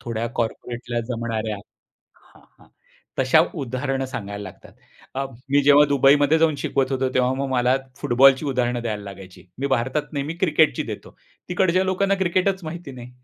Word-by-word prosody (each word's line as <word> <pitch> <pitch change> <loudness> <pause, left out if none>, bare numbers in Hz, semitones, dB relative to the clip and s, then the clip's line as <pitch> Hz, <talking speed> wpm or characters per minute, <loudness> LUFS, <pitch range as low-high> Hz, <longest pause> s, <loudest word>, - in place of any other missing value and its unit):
थोड्या 115 -2 -3
कॉर्पोरेटला 120 +1 -3
जमणाऱ्या 115 -3 -3 0.6
हा, - - -23 0.2
हां. - - -21 0.5
तशा - - +5 0.2
उदाहरणं 135 +1 -2
सांगायला 100 -5 -6
लागतात. 95 - -12 0.4
अ, 135 +1 -1 0.3
मी 145 0 +4
जेव्हा 145 +1 +7
दुबईमध्ये 145 +2 +4
जाऊन 160 -2 +3
शिकवत 135 -1 -1
होतो, 130 0 0
तेव्हा 130 0 +2
मग 135 0 -3
मला 125 0 +2 0.2
फुटबॉलची 130 +4 +4
उदाहरणं 125 -2 -1
द्यायला 105 -3 -3
लागायची. 95 -2 -11
मी 140 - -1
भारतात 135 +3 -1
नेहमी 145 +3 -3
क्रिकेटची 155 -4 +3
देतो, - - -11 0.3
तिकडच्या 185 +1 +2
लोकांना 195 +1 +1
क्रिकेटच 185 +1 0
माहिती 155 -3 -7
नाही. 125 0 -11
130 Hz, 150 wpm, -23 LUFS, 120-150 Hz, 0.6 s, जेव्हा